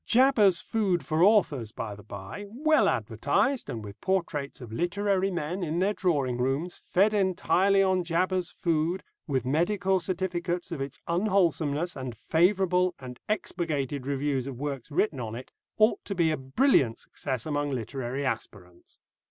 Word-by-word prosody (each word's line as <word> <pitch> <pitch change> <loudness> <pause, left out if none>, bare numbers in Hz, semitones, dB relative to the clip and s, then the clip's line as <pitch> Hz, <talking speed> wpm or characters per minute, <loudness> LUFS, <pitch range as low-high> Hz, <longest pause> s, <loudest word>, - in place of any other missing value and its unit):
"Jabber's 225 -8 +4
Food 200 -6 0
for 155 0 0
Authors," 175 - +3
by 110 -1 -5
the 105 - -11
bye, 100 - -8
well 305 +8 +3
advertised, 275 -2 0
and 110 -2 -5
with 100 -1 -11
portraits 170 -7 -1
of 120 -4 -9
literary 195 - 0
men, 175 +1 -3
in 165 -1 -2
their 195 +4 +2
drawing 140 -11 0
rooms, 135 +8 -1
"Fed 200 +4 +2
entirely 195 0 +3
on 185 -1 +2
Jabber's 180 +1 0
Food," 170 +2 -1 0.2
with 135 -4 -1
medical 185 +7 +1
certificates 175 -1 -2
of 160 -5 -4
its 135 0 -5
unwholesomeness, 170 -4 +1
and 130 -4 -6
favourable 180 - +2
and 125 -2 -9
expurgated 150 - -2
reviews 140 -2 -1
of 135 -3 -6
works 140 -3 -4
written 150 -1 0
on 115 -2 -4
it, 125 +2 -9 0.3
ought 215 +2 +3
to 200 - -4
be 165 -3 +3
a - - +1
brilliant 135 - +2
success 130 -4 -4
among 145 -1 -1
literary 130 +1 -3
aspirants. 95 -7 -6
170 Hz, 150 wpm, -28 LUFS, 135-190 Hz, 0.3 s, Jabber's